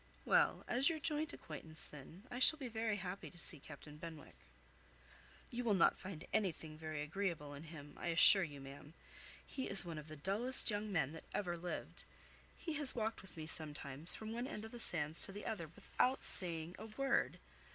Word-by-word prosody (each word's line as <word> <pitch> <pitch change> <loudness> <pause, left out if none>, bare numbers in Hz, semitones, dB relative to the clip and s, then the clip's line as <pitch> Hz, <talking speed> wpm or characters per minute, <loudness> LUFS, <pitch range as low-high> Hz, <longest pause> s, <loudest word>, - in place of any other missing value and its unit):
"Well, - - +2
as 260 +5 +2
your 325 - -3
joint 305 0 -3
acquaintance, 160 -1 -4
then, 150 +6 -13
I 245 - -5
shall 315 +4 +5
be 270 -4 -7
very 220 -2 -3
happy 185 0 -7
to 175 - -18
see 175 -2 -4
Captain 150 +1 -13
Benwick." 165 -2 -11 1.2
"You 245 +1 -4
will 220 -4 +1
not 185 - +2
find 185 -5 -9
anything 165 -7 -2
very 155 -1 -6
agreeable 165 -3 -4
in 145 +3 -10
him, 150 -3 -12
I - - -6
assure 170 +4 +10
you, 145 -5 -6
ma'am. 140 +3 -12 0.5
He 265 - -6
is 195 -2 +7
one 165 -3 -6
of 150 - -12
the 155 - -10
dullest 215 - +1
young 210 0 -4
men 160 -7 -1
that 160 - -11
ever 180 -4 -3
lived. 175 +1 -7 0.5
He 325 - -6
has 285 -3 -4
walked 225 -1 -3
with 190 -2 -16
me, 155 - -6
sometimes, 150 -1 +2
from 220 0 -8
one 240 +2 -4
end 210 -3 -7
of 220 - -11
the 240 - -10
sands 160 -6 +2
to - - -10
the 205 +1 -9
other, 185 -7 -5
without 205 - -2
saying 170 -1 +5
a 220 - -9
word. 270 +5 -1
180 Hz, 195 wpm, -36 LUFS, 155-220 Hz, 1.2 s, assure